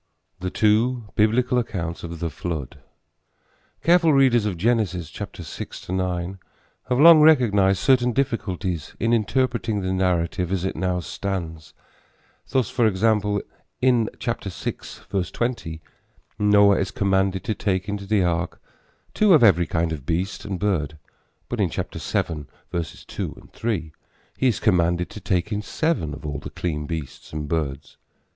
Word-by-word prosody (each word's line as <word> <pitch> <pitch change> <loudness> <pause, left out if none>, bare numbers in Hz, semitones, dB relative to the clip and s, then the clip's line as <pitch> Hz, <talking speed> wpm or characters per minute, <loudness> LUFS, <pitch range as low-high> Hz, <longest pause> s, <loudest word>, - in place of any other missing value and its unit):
THE 90 0 -2
TWO 110 +3 +2
BIBLICAL 120 +4 +2
ACCOUNTS 85 -8 -4
OF 85 -1 -6
THE 85 -1 -2
FLOOD. 80 -4 -5 1.0
Careful 170 -1 +5
readers 130 -6 +4
of 95 -4 -3
Genesis 95 -5 0
6 - - -8
9 90 0 -2 0.5
have 125 0 +2
long 165 0 +9
recognized 105 -11 +5
certain 125 +3 +3
difficulties 95 - -2
in 115 +2 +1
interpreting 115 -1 0
the 95 0 -1
narrative 90 -1 0
as 95 -1 -1
it 95 - -2
now 90 -1 -1
stands. 85 -4 -5 0.7
Thus, 130 -5 +1
for 120 -4 +3
example, 105 0 +1 0.4
in 125 -3 +3
6:20 100 -3 -4 0.6
Noah 105 -1 +5
is 95 - -1
commanded 95 -1 +1
to 110 - -1
take 95 -2 -1
into 100 -1 -4
the 105 -2 +2
ark 85 0 -1 0.5
two 210 -4 +5
of 150 - +5
every 90 -6 +5
kind 80 0 0
of 70 -4 -8
beast 90 +4 -2
and 100 -3 -3
bird; 80 -8 -1 0.5
but - - -4
in - - +2
7:2, 80 +2 -5
3 95 -9 -3 0.4
he 130 - +1
is 115 -6 +1
commanded 90 -3 +2
to - - -8
take 95 0 -1
in 105 0 -1
seven 105 - -1
of - - -11
all 70 -1 -3
the - - -8
clean 75 -4 -3
beasts 80 -5 -6
and 75 -1 -4
birds. 70 -4 -3
95 Hz, 140 wpm, -23 LUFS, 85-115 Hz, 1.0 s, long